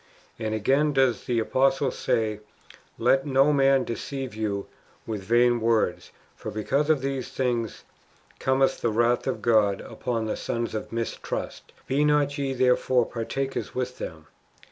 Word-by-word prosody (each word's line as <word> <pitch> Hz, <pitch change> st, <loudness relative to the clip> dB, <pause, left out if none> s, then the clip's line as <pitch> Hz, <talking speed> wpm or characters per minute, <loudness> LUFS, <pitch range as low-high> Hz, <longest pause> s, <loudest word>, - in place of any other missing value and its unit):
And 110 Hz, -1 st, -2 dB
again 140 Hz, +8 st, +2 dB
does 130 Hz, -4 st, +2 dB
the 120 Hz, -, 0 dB
apostle 135 Hz, +3 st, +2 dB
say, 110 Hz, -2 st, -1 dB, 0.3 s
" -, -, -32 dB, 0.3 s
Let 135 Hz, +2 st, +2 dB
no 135 Hz, +2 st, +4 dB
man 135 Hz, -1 st, +4 dB
deceive 130 Hz, +1 st, -5 dB
you 105 Hz, -2 st, -2 dB, 0.4 s
with 110 Hz, -3 st, -4 dB
vain 120 Hz, +4 st, +3 dB
words; 115 Hz, -1 st, +1 dB, 0.3 s
for -, -, -7 dB
because 140 Hz, +8 st, 0 dB
of 155 Hz, -4 st, +3 dB
these 135 Hz, -1 st, -3 dB
things 120 Hz, -4 st, -2 dB, 0.6 s
cometh 130 Hz, 0 st, +2 dB
the 120 Hz, -, +1 dB
wrath 120 Hz, +3 st, +1 dB
of 130 Hz, -, -2 dB
God 105 Hz, -4 st, +3 dB
upon 115 Hz, -3 st, -3 dB
the 110 Hz, -, -2 dB
sons 115 Hz, -1 st, -3 dB
of 110 Hz, -, -5 dB
mistrust. 115 Hz, 0 st, -4 dB
Be 140 Hz, +3 st, +1 dB
not 150 Hz, -1 st, +2 dB
ye 135 Hz, -1 st, -1 dB
therefore 125 Hz, -1 st, +3 dB
partakers 135 Hz, +4 st, -4 dB
with 125 Hz, 0 st, -3 dB
them." 80 Hz, -2 st, -7 dB
125 Hz, 150 wpm, -26 LUFS, 115-135 Hz, 0.6 s, no